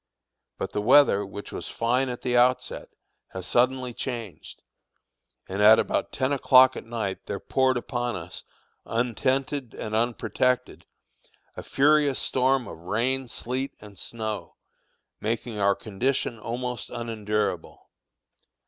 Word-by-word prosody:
But - - -4
the 105 - -1
weather, 120 -3 +5
which 100 +1 -8
was - - -6
fine 125 +3 0
at 125 - -6
the 125 -1 0
outset, 125 +1 +2 0.4
has 95 -1 -5
suddenly 125 +3 +1
changed, 115 -6 -6 0.8
and 95 +2 -3
about 110 +2 +5
ten 130 +2 0
o'clock 130 -1 +6
at - - -7
night 110 -5 -4
there 100 - -3
poured 130 -1 +1
upon 120 0 -2
us, 90 0 -8 0.4
untented 130 +2 -1
and 110 - -5
unprotected, 120 +2 0 0.7
a - - -6
furious 145 -1 +3
storm 130 -1 +1
of 80 - -9
rain, 120 +9 -1
sleet, 130 +4 -4
and 105 -3 -12
snow, 110 -2 -5 0.6
making 110 0 -3
our 100 0 +3
condition 115 +3 -2
almost 125 +2 -4
unendurable. 105 -5 -3
120 Hz, 120 wpm, -26 LUFS, 105-130 Hz, 0.8 s, o'clock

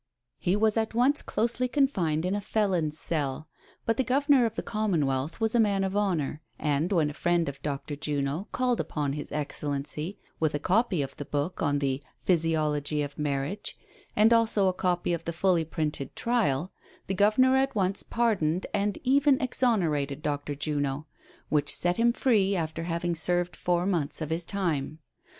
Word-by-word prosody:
He 180 - +1
was 215 +1 +2
at 225 0 -1
once 265 +5 +3
closely 240 +3 0
confined 190 - +1
in 185 - 0
a 205 - -1
felon's 185 -8 0
cell, 150 -3 -2 0.4
but 225 0 +1
the 265 - +2
Governor 270 -1 +3
of 225 - -7
the - - -3
Commonwealth 160 - -1
was 225 -1 +1
a 240 - +3
man 200 -3 +3
of 190 +1 -2
honor, 170 -8 0 0.2
and 150 +4 0
when 160 -6 +2
a - - -10
friend 175 +1 +1
of 140 -1 -6
Dr. 145 0 -4
Juno 145 +5 -2
called 250 -2 +1
upon 145 -2 -2
his 145 0 -6
excellency 150 +4 -3 0.2
with 155 -2 +1
a - - 0
copy 185 -1 +2
of 135 - -7
the 145 - -5
book 145 +6 -2
on 145 -2 +2
the 135 -1 -1 0.2
"Physiology 155 -3 +1
of 145 +1 -7
Marriage," 145 +7 -3 0.4
and 220 +2 +5
also 220 -4 +3
a 185 - +2
copy 180 -1 0
of 165 -1 -4
the 170 - -2
fully 175 -1 +2
printed 150 -3 -3
trial, 190 - 0 0.3
the 195 - -2
Governor 215 +7 +4
at 270 0 +1
once 195 -1 +1
pardoned 190 -8 0
and 205 0 0
even 275 +1 +4
exonerated 165 - 0
Dr. 145 0 -2
Juno, 145 0 -2 0.4
which 150 -1 +1
set 175 0 +1
him 235 +1 +4
free 210 -6 +2
after 165 -1 -3
having 170 0 -1
served 175 +2 0
four 175 0 0
months 165 -7 -1
of 155 -1 -4
his 165 +1 -1
time. 160 -7 -1
175 Hz, 175 wpm, -28 LUFS, 150-215 Hz, 0.4 s, and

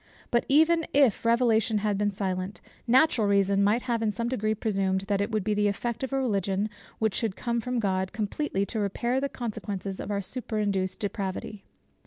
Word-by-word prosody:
But 235 - +2
even 320 +3 +4
if 275 -7 +4
Revelation 230 -2 +3
had 210 0 0
been 205 +1 +1
silent, 190 -1 -3 0.3
natural 250 -3 +4
reason 200 0 +3
might 215 +4 +2
have 235 -3 -1
in 220 - +1
some 235 +3 -2
degree 215 -3 0
presumed, 195 -3 0
that 200 0 -1
it 205 - -1
would 215 -3 -1
be 210 +1 0
the 210 0 +2
effect 230 +3 -2
of 265 - -3
a 270 - 0
Religion 200 -4 0 0.3
which 220 -2 +1
should 220 -5 -1
come 235 -1 -1
from 250 +1 -2
God, 190 -4 0
completely 210 0 -1
to 220 - -4
repair 235 +6 0
the 280 - -1
consequences 205 -5 -5
of - - -5
our 200 -1 -1
superinduced 205 -5 -2
depravity. 200 0 -4
210 Hz, 190 wpm, -27 LUFS, 200-235 Hz, 0.3 s, even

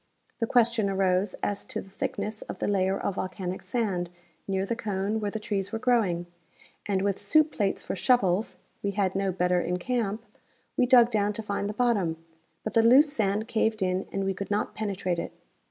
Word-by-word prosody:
The 230 - 0
question 230 -4 +3
arose 190 0 +1
as 205 -1 -1
to - - -4
the 195 - -11
thickness 215 +2 -3
of - - -7
the - - -2
layer 195 -1 +1
of - - -1
volcanic 185 -1 -4
sand 195 -8 -1 0.4
near 195 0 0
the 230 - -2
cone 205 0 -2
where 210 -1 -1
the 220 - -4
trees 200 -2 -2
were 225 - -1
growing; 225 -8 +1 0.6
and 195 -2 +1
Avith 200 -1 0
soup 305 +9 +3
plates 200 -6 -1
for - - -3
shovels 205 -4 +2 0.2
(we 200 0 -1
had 190 -2 +2
no 195 0 0
better 180 0 +1
in 180 +1 -1
camp) 225 +1 -2 0.5
we 250 - +3
dug 245 -2 +6
down 210 -1 +1
to 220 - -5
find 200 -1 -2
the 210 - -5
bottom, 205 -10 +1 0.5
but 215 - -4
the 230 - +5
loose 270 +6 +6
sand 215 -3 0
caved 220 -2 +1
in 185 +1 -1
and 195 - -1
we 195 0 0
could 195 +1 -6
not 205 +1 -1
penetrate 185 -5 -2
it. - - -5
200 Hz, 200 wpm, -27 LUFS, 190-225 Hz, 0.6 s, dug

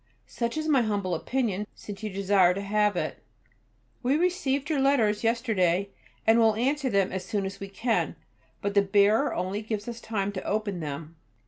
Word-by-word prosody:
Such 235 +3 -3
is 310 0 -2
my 280 -5 +4
humble 205 -5 -1
opinion, 210 +1 -1
since 200 -2 -9
you 215 - -3
desire 190 -2 +3
to 200 - -3
have 210 0 +1
it.[B] - - -3 0.8
We 265 +4 +2
received 300 -6 0
your 305 -3 0
letters 235 -7 +2
yesterday, 200 -6 +1 0.4
and 225 +1 +5
will 220 -2 +4
answer 270 +4 0
them 195 -4 +2
as 190 0 -3
soon 195 +1 -2
as 195 +1 -6
we 195 - -6
can, 225 +4 0 0.5
but 200 0 -1
the 200 - +5
bearer 205 +7 +3
only 185 +3 -2
gave 215 -1 -4
us 235 -1 -6
time 205 -3 -2
to 190 -2 -5
open 205 -3 -2
them. 155 +1 -6
210 Hz, 185 wpm, -27 LUFS, 195-235 Hz, 0.8 s, and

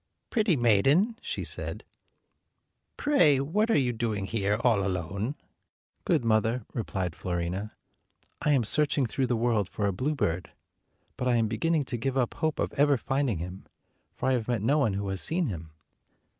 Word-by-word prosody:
"Pretty 215 -7 +3
maiden," 135 - +3
she - - -4
said, - - -4 1.1
"pray 170 - +4
what 205 +11 +1
are 225 - +4
you 125 -4 +1
doing 110 -3 -2
here, 105 +1 0
all 115 -5 +3
alone?" 100 - -2 0.7
"Good 120 - +2
mother," 110 +1 +1
replied 95 -7 -3
Fiorina, 90 +4 -3 0.7
"I 150 - +3
am 130 -4 +3
searching 140 +3 +1
through 130 +3 -1
the 120 - +1
world 115 -4 +1
for 105 - -2
a 100 - +1
bluebird; 125 - -1 0.6
but 125 - -1
I 125 - +3
am 115 -1 +2
beginning 145 +8 0
to 125 - -3
give 135 +3 -2
up 125 -3 +1
hope 160 -2 -1
of - - -2
ever 145 -1 +3
finding 135 -4 0
him, 90 +3 -7 0.5
for - - -2
I - - +3
have 120 -4 -1
met 120 -5 -1
no 145 +7 +3
one 115 -8 +2
who 100 +1 -3
has 95 -1 -2
seen 170 +2 +1
him." 80 -5 -6
120 Hz, 170 wpm, -28 LUFS, 100-140 Hz, 1.1 s, pray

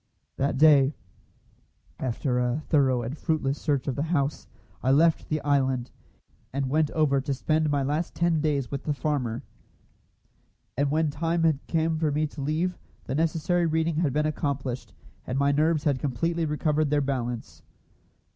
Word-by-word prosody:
That 140 0 0
day, 145 -1 +6 1.0
after 125 0 -1
a 125 +5 -1
thorough 130 -5 +3
and 120 +5 -4
fruitless 150 -4 -1
search 140 -4 0
of 135 - -1
the - - -2
house, 145 -3 -1 0.3
I 130 - 0
left 160 +4 +3
the 155 - 0
island, 135 -3 +1 0.6
and 135 -1 -2
went 155 0 +2
over 140 -4 +2
to 140 +1 -2
spend 155 +3 +1
my 145 -1 +1
last 150 +5 -2
ten 170 -2 +1
days 145 -4 0
with 140 -1 -4
the 150 - 0
farmer; 135 -6 -2 1.3
and 140 +2 +1
when 155 +1 +1
the 145 - -15
time 165 -2 +1
came 160 -1 0
for 155 -2 +1
me 150 +2 +1
to 150 -1 -7
leave, 160 +5 -1 0.2
the 130 - -4
necessary 165 +3 +1
reading 160 0 0
had 160 -4 +1
been 150 +3 +1
accomplished, 140 -4 -3 0.4
and 130 - -2
my 140 +1 +3
nerves 155 +1 +2
had 140 -4 +1
completely 165 +6 -1
recovered 150 0 0
their 145 0 +2
balance. 125 -4 -3
145 Hz, 165 wpm, -26 LUFS, 135-155 Hz, 1.3 s, day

